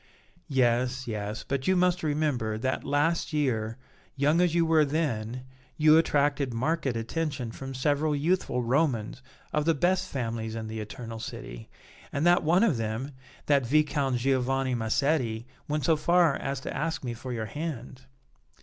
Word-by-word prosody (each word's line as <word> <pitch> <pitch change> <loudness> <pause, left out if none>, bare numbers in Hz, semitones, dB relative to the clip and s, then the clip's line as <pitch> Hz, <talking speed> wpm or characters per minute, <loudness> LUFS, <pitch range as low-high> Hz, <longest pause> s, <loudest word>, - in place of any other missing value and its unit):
"Yes, 130 -1 +1
yes, 105 -1 -4
but 135 -1 -2
you 190 - +4
must 180 0 +2
remember 145 -8 0
that 130 +4 -2
last 150 +2 0
year, 115 -6 0 0.4
young 150 +5 +3
as 175 -2 +2
you 170 -1 +3
were 160 -1 +4
then, 130 -6 -2 0.3
you 155 0 +6
attracted 145 -5 +2
marked 155 +6 0
attention 125 +1 -2
from 135 +2 -7
several 145 +3 +1
youthful 145 -5 0
Romans 125 -3 0 0.3
of 150 0 +1
the 165 -1 +3
best 175 +6 +1
families 115 -3 -3
in 110 -1 -4
the 110 0 -5
Eternal 115 +1 -7
City, - - -8 0.4
and 140 +3 -1
that 175 0 +5
one 170 +6 +3
of 185 - +3
them, 115 +5 -3 0.3
the 145 -1 +4
Viscount 140 0 +1
Giovanni 130 +1 +1
Massetti, 120 0 0 0.2
went 150 0 -1
so 165 - +4
far 170 -1 +3
as 135 0 -3
to - - -5
ask 160 -2 -2
me 120 -2 -3
for 125 +2 -7
your 115 -2 -3
hand." 130 -1 -6
135 Hz, 160 wpm, -28 LUFS, 120-155 Hz, 0.4 s, you